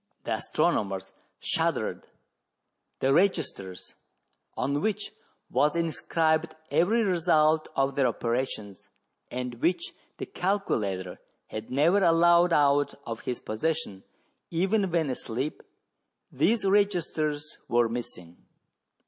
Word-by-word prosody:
The -, -, -4 dB
astronomers 95 Hz, -1 st, -1 dB, 0.3 s
shuddered; -, -, -1 dB, 0.9 s
the 135 Hz, +1 st, +3 dB
registers, 145 Hz, -, 0 dB, 0.6 s
on 140 Hz, +1 st, 0 dB
which 210 Hz, +1 st, -1 dB, 0.4 s
was 150 Hz, +3 st, +2 dB
inscribed 160 Hz, -1 st, 0 dB, 0.2 s
every 180 Hz, +10 st, +3 dB
result 160 Hz, -4 st, +3 dB
of 135 Hz, 0 st, +1 dB
their 135 Hz, -2 st, +2 dB
operations, 115 Hz, -4 st, -3 dB, 0.4 s
and 125 Hz, -1 st, -5 dB
which 330 Hz, -, 0 dB, 0.2 s
the -, -, -4 dB
calculator 105 Hz, -, -2 dB, 0.3 s
had 110 Hz, +1 st, -6 dB
never 165 Hz, +9 st, +3 dB
allowed 170 Hz, +1 st, +5 dB
out 145 Hz, -2 st, +3 dB
of 115 Hz, -1 st, -5 dB
his 125 Hz, -, -4 dB
possession, 110 Hz, -4 st, -2 dB, 0.5 s
even 190 Hz, +4 st, +1 dB
when 165 Hz, -5 st, +1 dB
asleep, 130 Hz, +3 st, -4 dB, 0.7 s
these 225 Hz, -2 st, +2 dB
registers 165 Hz, -7 st, 0 dB
were 120 Hz, 0 st, +3 dB
missing. 115 Hz, -8 st, -6 dB
150 Hz, 100 wpm, -27 LUFS, 120-175 Hz, 0.9 s, allowed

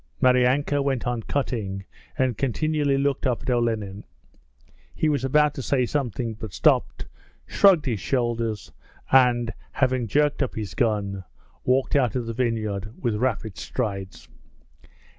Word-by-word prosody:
Maryanka 130 Hz, +3 st, +3 dB
went 135 Hz, -4 st, -1 dB
on 120 Hz, -1 st, -1 dB
cutting 105 Hz, -7 st, -3 dB, 0.3 s
and 130 Hz, -4 st, +1 dB
continually 145 Hz, +3 st, 0 dB
looked 140 Hz, -1 st, 0 dB
up 125 Hz, -1 st, -1 dB
at 130 Hz, -, -1 dB
Olenin. 110 Hz, -4 st, -1 dB, 0.9 s
He 155 Hz, -, +1 dB
was 145 Hz, -3 st, 0 dB
about 150 Hz, +2 st, +3 dB
to 135 Hz, -, -5 dB
say 130 Hz, -1 st, +1 dB
something, 120 Hz, -4 st, -2 dB
but 110 Hz, -3 st, -8 dB
stopped, -, -, +2 dB, 0.4 s
shrugged 185 Hz, -7 st, +4 dB
his 115 Hz, -6 st, -1 dB
shoulders 115 Hz, -5 st, -1 dB, 0.4 s
and, 120 Hz, -3 st, +4 dB, 0.2 s
having 130 Hz, -3 st, +1 dB
jerked 145 Hz, +7 st, +1 dB
up 135 Hz, -, -1 dB
his 105 Hz, -3 st, -5 dB
gun, 100 Hz, -5 st, -1 dB, 0.4 s
walked 130 Hz, +2 st, +2 dB
out 125 Hz, -6 st, +2 dB
of 125 Hz, -2 st, -1 dB
the 115 Hz, -, -4 dB
vineyard 110 Hz, -4 st, -2 dB
with 120 Hz, -4 st, 0 dB
rapid 110 Hz, -2 st, -2 dB
strides. 100 Hz, -6 st, -4 dB
125 Hz, 140 wpm, -24 LUFS, 110-135 Hz, 0.9 s, shrugged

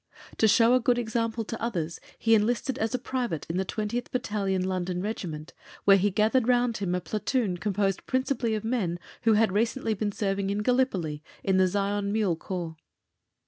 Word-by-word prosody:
To 220 Hz, -, +4 dB
show 230 Hz, +3 st, +5 dB
a 255 Hz, -, +5 dB
good 245 Hz, 0 st, +2 dB
example 230 Hz, -1 st, -1 dB
to 225 Hz, -, -6 dB
others, 170 Hz, -8 st, -2 dB, 0.2 s
he 225 Hz, -, +3 dB
enlisted 230 Hz, +4 st, +1 dB
as 225 Hz, +3 st, 0 dB
a -, -, +2 dB
private 245 Hz, -, -3 dB
in 175 Hz, -, -2 dB
the 190 Hz, -, +1 dB
20th 220 Hz, +5 st, -3 dB
Battalion 200 Hz, -6 st, -1 dB
London 185 Hz, -1 st, -2 dB
Regiment, 175 Hz, -6 st, -5 dB, 0.3 s
where 195 Hz, -1 st, +7 dB
he 200 Hz, +2 st, +2 dB
gathered 220 Hz, +5 st, +2 dB
round 245 Hz, -2 st, +2 dB
him 185 Hz, -3 st, -1 dB
a -, -, 0 dB
platoon 215 Hz, 0 st, -1 dB
composed 195 Hz, 0 st, -1 dB
principally 260 Hz, -3 st, 0 dB
of 215 Hz, -, -3 dB
men 220 Hz, -7 st, -1 dB, 0.3 s
who 225 Hz, -, +6 dB
had 215 Hz, -1 st, +3 dB
recently 225 Hz, +3 st, 0 dB
been 210 Hz, 0 st, -2 dB
serving 195 Hz, -1 st, -1 dB
in 205 Hz, +1 st, -1 dB
Gallipoli 200 Hz, -, +1 dB, 0.2 s
in 190 Hz, -1 st, +2 dB
the 185 Hz, 0 st, +5 dB
Zion 200 Hz, +1 st, -1 dB
Mule 205 Hz, -5 st, +1 dB
Corps. 170 Hz, -2 st, -5 dB
210 Hz, 185 wpm, -27 LUFS, 190-230 Hz, 0.3 s, where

